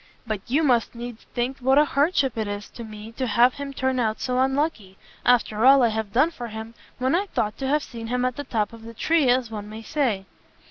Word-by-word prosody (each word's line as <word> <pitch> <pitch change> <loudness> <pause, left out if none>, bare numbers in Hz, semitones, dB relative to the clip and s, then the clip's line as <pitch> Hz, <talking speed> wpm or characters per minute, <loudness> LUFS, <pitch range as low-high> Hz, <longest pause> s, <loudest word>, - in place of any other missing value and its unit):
But 215 -3 -3
you 285 +7 +2
must 245 -5 +2
needs 240 -1 -8
think 250 +2 -1
what 265 +2 +3
a 300 - +6
hardship 280 -3 +1
it 220 -2 -2
is 205 0 -5
to 235 - -8
me 215 0 -9
to 255 +2 -3
have 240 +3 +4
him 280 0 -6
turn 260 -1 -1
out 220 -2 0
so 250 0 -1
unlucky, 265 -8 0 0.3
after 230 -3 +3
all 270 0 +7
I 235 - +4
have 220 -2 -3
done 265 +9 +3
for 245 -7 -7
him, 220 +1 -7 0.2
when 260 +3 0
I 385 +4 +1
thought 215 - -1
to 270 - -2
have 295 +2 +2
seen 230 -2 -8
him 250 +1 0
at 255 -1 -1
the 285 - -5
top 215 -5 -1
of 230 - -11
the 230 +1 -10
tree, 315 +1 +2
as 245 -2 +2
one 210 -1 -6
may 220 +1 -8
say!" 225 -7 -1
245 Hz, 240 wpm, -24 LUFS, 220-270 Hz, 0.3 s, all